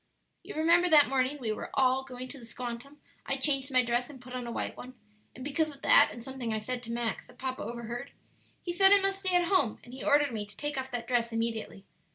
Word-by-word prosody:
"You - - -9
remember 340 +3 +4
that 300 -4 +6
morning 265 +2 +1
we 230 -4 -2
were 215 - -5
all 265 -1 +3
going 255 -1 -8
to 280 - -8
the 235 - -11
'squantum' 245 +4 -7 0.3
I 270 - 0
changed 270 -1 +2
my 255 -1 +4
dress 240 +2 0
and 275 -3 -11
put 250 0 -12
on 250 -1 -4
a - - -4
white - - -3
one, 255 +1 -10 0.4
and 255 - -8
because 310 +2 0
of 280 -2 -13
that, - - +7
and 235 - -8
something 260 -3 -5
I 220 - 0
said 245 +3 -4
to 230 -1 -7
Max 235 -1 -2
that - - -18
papa 260 0 -4
overheard, 235 +3 -5 0.5
he 350 - -3
said 385 +2 +5
I 405 - +8
must 390 0 0
stay 375 -2 0
at 355 -1 +4
home; 335 - +3
and 245 - -13
he 260 - -7
ordered 290 -1 +3
me 210 -2 -4
to 205 - -13
take 295 0 -3
off 265 0 -3
that 240 -2 -4
dress 235 -1 +1
immediately. 225 -3 -3
255 Hz, 250 wpm, -30 LUFS, 235-290 Hz, 0.5 s, I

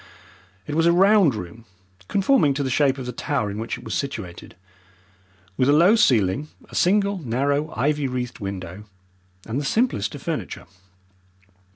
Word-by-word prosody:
It 150 - -5
was 165 +2 +2
a - - +6
round 190 - +4
room, 105 +4 -8 0.4
conforming 190 - +2
to 140 - -1
the 130 - -2
shape 135 +1 +2
of 130 - -6
the 125 - -4
tower 125 -4 -2
in 105 - -6
which 115 - -4
it - - -13
was - - -5
situated, 110 -11 -5 1.0
with 130 +1 +2
a - - +5
low 175 +8 +5
ceiling, 130 - +2 0.2
a - - -19
single 200 +1 +2
narrow, 140 +3 -1
ivy 145 +1 0
wreathed 125 -1 -4
window, 95 0 -6 0.6
and 120 +6 -3
the - - -5
simplest 140 - 0
of - - -10
furniture. - - -4
140 Hz, 165 wpm, -23 LUFS, 115-165 Hz, 1.0 s, a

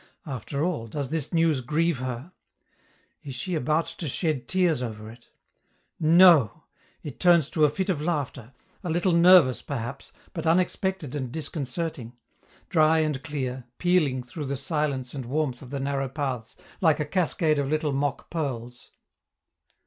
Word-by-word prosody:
After 140 +1 -4
all, 160 -10 -2
does 135 +4 -4
this 160 -4 -2
news 165 -5 +2
grieve 155 +3 0
her? 130 +5 -5 0.9
Is 135 -3 -7
she 180 +8 -4
about 155 +2 +1
to 165 - -6
shed 150 -1 -1
tears 180 -7 +2
over 110 -2 -6
it? 120 +1 -18 0.7
No! 160 - +6 0.4
it 145 - -8
turns 170 -5 +4
to 155 -2 +4
a - - +4
fit 190 +6 -2
of 175 -7 0
laughter, 145 -7 -3 0.3
a 180 - -3
little 175 +3 +1
nervous 170 -6 +6
perhaps, 135 0 -5 0.2
but 165 -1 -4
unexpected 185 -2 0
and 130 -4 -4
disconcerting 155 -3 -4 0.5
dry 160 -2 +4
and 155 -4 0
clear, 130 -5 -4
pealing 155 -8 +2
through 145 +5 -7
the 140 0 -3
silence 140 -3 -2
and 130 -4 -6
warmth 135 -2 -1
of 130 - -11
the 140 +1 -4
narrow 135 -1 -1
paths, 130 -5 -4 0.2
like 160 -4 +4
a 150 - 0
cascade 160 -2 +1
of 140 -1 -1
little 155 -1 0
mock 140 0 -2
pearls. 125 -7 -4
150 Hz, 155 wpm, -26 LUFS, 130-165 Hz, 0.9 s, No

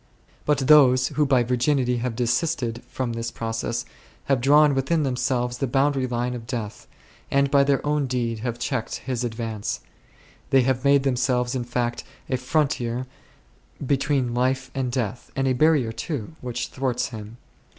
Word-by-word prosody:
But 150 -1 +3
those 130 -3 +6
who 150 -1 +1
by 130 -3 +4
virginity 125 +1 +1
have 120 -1 -2
desisted 120 0 0
from 125 -3 -3
this 115 0 -3
process 115 +1 -3 0.4
have 135 -3 +1
drawn 145 +2 +5
within 140 +4 +1
themselves 125 -2 -1
the 135 - 0
boundary 135 +1 +1
line 120 0 -1
of 115 -2 -7
death, 115 -4 -5 0.4
and 140 0 +2
by 140 -1 +5
their 140 0 +1
own 150 -2 +1
deed 120 -3 -1
have 120 +1 -3
checked 125 -1 -2
his 125 -2 -2
advance; 110 -3 -3 0.7
they 135 -1 +5
have 130 0 0
made 140 -1 +4
themselves, 125 -1 +1
in 125 -2 -2
fact, 120 -1 -2 0.3
a 130 - +2
frontier 130 -3 0 0.8
between 135 -2 +1
life 130 +1 0
and 130 -2 -2
death, 120 -2 -3
and 135 0 0
a 130 - +3
barrier 145 -3 +3
too, 145 +2 -5
which 125 -1 -4
thwarts 130 -2 -1
him. 110 0 -9
125 Hz, 160 wpm, -24 LUFS, 120-135 Hz, 0.8 s, those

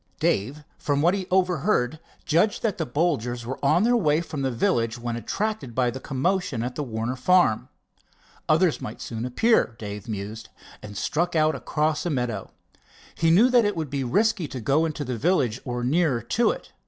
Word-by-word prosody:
Dave, 135 +10 0 0.2
from 145 0 0
what 175 +2 +4
he 190 -2 -3
overheard, 180 -6 +1 0.3
judged 175 +7 +2
that 210 -5 -1
the 160 - -1
Bolgers 125 -5 -1
were 130 +4 -6
on 170 +7 +4
their 240 +2 +3
way 155 -9 +3
from 160 -4 -5
the 135 - 0
village 115 -1 0
when 120 -1 -4
attracted 205 - -3
by 125 -2 +2
the 130 - -6
commotion 140 -2 -1
at 125 +1 -3
the 150 - -4
Warner 115 -1 -3
farm. 130 -4 +3 0.8
Others 160 +1 +3
might 105 - -6
soon 115 0 -5
appear, 175 - +2
Dave 105 -1 -7
mused, 105 +2 -6 0.3
and 105 -1 -9
struck 170 - -1
out 155 0 +3
across 155 0 -1
a 175 - -1
meadow. 125 - -2 0.6
He 165 - +1
knew 215 +10 +5
that 245 -2 +5
it 205 -1 0
would 155 -4 -4
be 140 -1 -1
risky 200 - +1
to 130 - -6
go 140 +8 +2
into 155 -2 -3
the 125 -2 -3
village 130 - +1
or 120 -2 -3
nearer 135 -3 +1
to 235 - +2
it. - - -5
145 Hz, 190 wpm, -25 LUFS, 120-175 Hz, 0.8 s, knew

